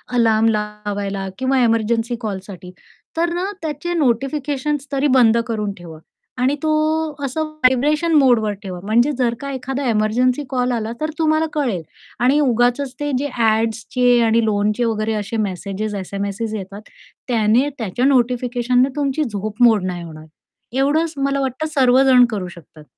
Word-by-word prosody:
Alarm 225 -1 +3
लावायला 205 -2 -3
किंवा 260 0 +1
emergency 230 +1 +1
कॉलसाठी, 190 -3 -6 0.5
तर 340 +1 +1
ना 375 +3 -2
त्याचे 315 +3 -3
नोटिफिकेशन्स 285 +1 -1
तरी 280 +1 +1
बंद 235 -2 +5
करून 210 -3 -2
ठेवा 165 -2 -11 0.4
आणि 265 +3 +2
तो 310 - +1 0.5
असं 295 +4 -2
व्हायब्रेशन 305 +2 +1
मोडवर 245 -8 +4
ठेवा 185 -3 -6
म्हणजे 240 +7 +2
जर 240 -2 +1
का 280 0 -4
एखादा 265 +1 -4
एमर्जन्सी 245 +6 +1
कॉल 250 -1 0
आला 225 -2 -2
तर 310 - -1
तुम्हाला 315 0 +2
कळेल 245 - -1 0.4
आणि 275 +4 +4
उगाचच 250 0 +1
ते 290 0 -2
जे 285 +1 -2
ॲड्सचे 225 +2 +2
आणि 230 0 +3
लोनचे 210 +2 0
वगैरे 220 -1 -1
असे 215 +1 -3
मेसेज 200 +3 -4
एस-एम-एसेस 200 +3 -4
येतात, 200 +1 -7 0.5
त्याने 235 +3 +2
त्याच्या 230 +3 -2
नोटिफिकेशनने 250 0 +2
तुमची 290 +1 0
झोप 215 -1 -5
मोड 220 -5 +5
नाही 180 -2 -4
होणार. 155 -2 -10 0.5
एवढंच 310 +4 +1
मला 275 0 0
वाटतं 270 +4 -2
सर्वजण 260 -1 +5
करू 200 -5 -3
शकतात. 165 -3 -14
240 Hz, 145 wpm, -19 LUFS, 210-275 Hz, 0.5 s, बंद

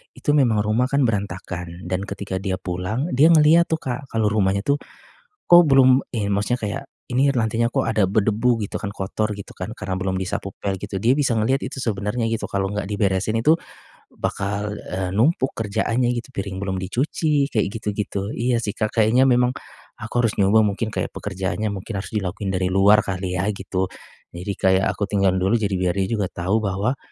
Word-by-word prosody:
Itu - - 0
memang 120 -7 +3
rumah 110 +4 +1
kan 140 0 +3
berantakan, 90 -4 -4
dan 95 +1 -1
ketika 100 -1 -5
dia 95 -1 -2
pulang, 95 - -3
dia 145 +5 +6
ngelihat 165 +2 +6
tuh, 160 - +1
Kak, 130 +1 -5
kalau 110 -1 +1
rumahnya 100 -2 +1
tuh, 140 - +4 0.7
kok 175 0 +9
belum 130 -1 +5
in 100 -3 -1
maksudnya 105 +5 0
kayak 110 +6 -3 0.3
ini 135 +3 +3
lantainya 115 0 +1
kok - - 0
ada 110 -2 +2
berdebu 110 +4 +2
gitu - - -9
kan, 100 - -4
kotor 105 +2 -2
gitu 100 - -9
kan, 95 +4 -5
karena 95 0 -4
belum 95 0 -1
disapu 95 +1 -3
pel 100 -1 -1
gitu. 95 +1 -4
Dia 120 +6 +3
bisa 140 -5 +1
ngelihat 130 +5 +1
itu 135 +1 -5
sebenernya 105 +1 -1
gitu, 115 - -2
kalau 95 -1 0
enggak 105 - -2
diberesin 100 +1 0
itu, 155 +7 +5 0.5
bakal, 100 +1 -3
eee, 90 -1 -4
numpuk 130 - +2
kerjaannya 115 +3 0
gitu. 120 - -6
Piring 100 -2 -4
belum 95 -1 -2
dicuci, 140 - 0
kayak 110 -3 +2
gitu-gitu. 105 -1 -3
Iya 120 0 0
sih, 105 - -2
Kak. 110 +1 -2
Kayaknya 120 +5 +4
memang 125 0 +3 0.5
aku 115 - -7
harus 115 - +2
nyoba 105 +3 +5
mungkin 105 +2 -1
kayak - - -3
pekerjaannya 95 +2 -3
mungkin 100 +3 -6
harus - - -9
dilakuin 100 -1 -2
dari 95 0 0
luar 100 +2 +5
kali 90 -1 -3
ya, 90 - 0
gitu. 95 -1 -2 0.5
Jadi 90 +4 -4
kayak 95 0 +3
aku 100 - -2
tinggal 95 -2 +2
dulu, 95 +4 +1
jadi 100 -2 0
biar 90 -1 +1
dia 95 -1 0
juga 100 - 0
tahu 95 +5 0
bahwa, 100 +7 -1
105 Hz, 190 wpm, -22 LUFS, 95-120 Hz, 0.7 s, kok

